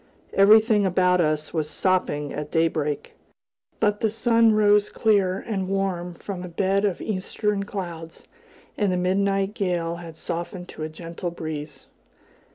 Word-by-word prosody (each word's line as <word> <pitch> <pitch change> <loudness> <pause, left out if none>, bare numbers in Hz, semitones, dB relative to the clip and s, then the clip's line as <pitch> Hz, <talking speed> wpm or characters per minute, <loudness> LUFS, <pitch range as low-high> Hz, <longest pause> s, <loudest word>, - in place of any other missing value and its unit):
Everything 215 +1 +6
about 180 -1 +3
us 155 -1 -1
was 155 -2 -1
sopping 150 -4 0
at 150 0 -5
daybreak; 155 -3 -1 0.7
but 205 -1 +2
the 220 - +1
sun 230 +1 +3
rose 210 -1 +4
clear 200 -4 +2
and 195 -3 -3
warm 185 -3 -2
from 190 +1 -6
a - - -5
bed 195 +3 +1
of 195 -4 -1
eastern 205 0 -2
clouds, 170 -5 -7 0.6
and 205 -3 +2
the 180 - 0
midnight 195 +2 +1
gale 175 -5 -1
had 165 -2 -10
softened 175 +2 -5
to - - -10
a 155 - -3
gentle 170 +2 -6
breeze. 155 -4 -7
185 Hz, 145 wpm, -24 LUFS, 165-200 Hz, 0.7 s, Everything